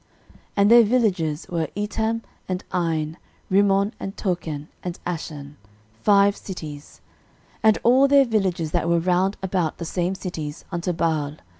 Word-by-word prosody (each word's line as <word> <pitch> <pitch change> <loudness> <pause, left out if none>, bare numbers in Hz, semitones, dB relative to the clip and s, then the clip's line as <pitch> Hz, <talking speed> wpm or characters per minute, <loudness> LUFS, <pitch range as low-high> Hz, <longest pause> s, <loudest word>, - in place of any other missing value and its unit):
13:004:032 - - -24 0.2
And 200 +2 +5
their 235 0 +9
villages 190 -10 +1
were, 165 -3 -1
Etam, 220 +2 -1 0.3
and 185 0 -2
Ain, 160 -2 -1 0.3
Rimmon, 200 +2 +3
and 195 - -5
Tochen, 160 -6 -3
and 180 -1 -5
Ashan, 150 -4 -5 0.4
five 200 -1 +5
cities: 155 -8 -9 0.6
13:004:033 - - -36
And 220 -1 +6
all 260 +4 +5
their 280 0 +6
villages 190 -8 0
that 170 - 0
were 170 - +3
round 180 +3 +1
about 180 -4 -1
the 170 - -5
same 180 +2 -1
cities, 160 -5 -6
unto 175 0 -1
Baal. 160 -4 -1
180 Hz, 150 wpm, -23 LUFS, 160-205 Hz, 0.6 s, their